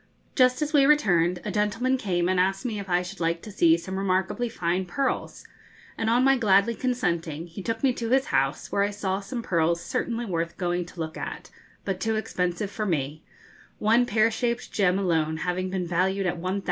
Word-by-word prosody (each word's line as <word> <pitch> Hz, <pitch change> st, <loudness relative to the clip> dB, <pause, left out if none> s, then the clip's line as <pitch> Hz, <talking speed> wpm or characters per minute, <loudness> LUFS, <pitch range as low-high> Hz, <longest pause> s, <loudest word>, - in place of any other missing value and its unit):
Just 255 Hz, +1 st, +3 dB
as 300 Hz, +1 st, -4 dB
we 275 Hz, -2 st, +5 dB
returned, 180 Hz, -, +3 dB
a -, -, -2 dB
gentleman 225 Hz, +5 st, +1 dB
came 180 Hz, -8 st, 0 dB
and 185 Hz, 0 st, +1 dB
asked 195 Hz, +3 st, +1 dB
me 220 Hz, -4 st, -2 dB
if 200 Hz, -1 st, -7 dB
I 180 Hz, 0 st, +2 dB
should 180 Hz, -, -9 dB
like 170 Hz, 0 st, -1 dB
to 215 Hz, -, -8 dB
see 170 Hz, -4 st, +4 dB
some 190 Hz, +3 st, -5 dB
remarkably 190 Hz, +5 st, 0 dB
fine 180 Hz, -1 st, -1 dB
pearls, 270 Hz, +9 st, -2 dB, 0.5 s
and 225 Hz, -, -1 dB
on 240 Hz, +2 st, +3 dB
my 270 Hz, 0 st, +5 dB
gladly 200 Hz, 0 st, +4 dB
consenting, 170 Hz, -, -2 dB
he 175 Hz, +3 st, -9 dB
took 225 Hz, +5 st, -3 dB
me 265 Hz, -2 st, +4 dB
to 230 Hz, -1 st, -4 dB
his 265 Hz, +2 st, +3 dB
house, 135 Hz, +2 st, 0 dB
where 200 Hz, -, +1 dB
I 200 Hz, -, +2 dB
saw 195 Hz, -2 st, -2 dB
some 205 Hz, +4 st, -5 dB
pearls 170 Hz, -2 st, +1 dB
certainly 235 Hz, +6 st, -2 dB
worth 170 Hz, -4 st, -3 dB
going 175 Hz, -1 st, -1 dB
to 175 Hz, -, -13 dB
look 160 Hz, -1 st, -4 dB
at, -, -, -6 dB, 0.3 s
but 195 Hz, -2 st, -2 dB
too 225 Hz, +1 st, 0 dB
expensive 185 Hz, -2 st, -2 dB
for 215 Hz, 0 st, -3 dB
me, 150 Hz, -2 st, -2 dB, 0.6 s
one 230 Hz, +3 st, +3 dB
pear 220 Hz, +1 st, +3 dB
shaped 235 Hz, +1 st, -2 dB
gem 190 Hz, -3 st, +2 dB
alone 160 Hz, -5 st, 0 dB
having 180 Hz, +3 st, -2 dB
been 185 Hz, -1 st, -2 dB
valued 190 Hz, +3 st, 0 dB
at 175 Hz, -1 st, -1 dB
1,000_l_. 185 Hz, +3 st, -1 dB
190 Hz, 205 wpm, -26 LUFS, 175-225 Hz, 0.6 s, we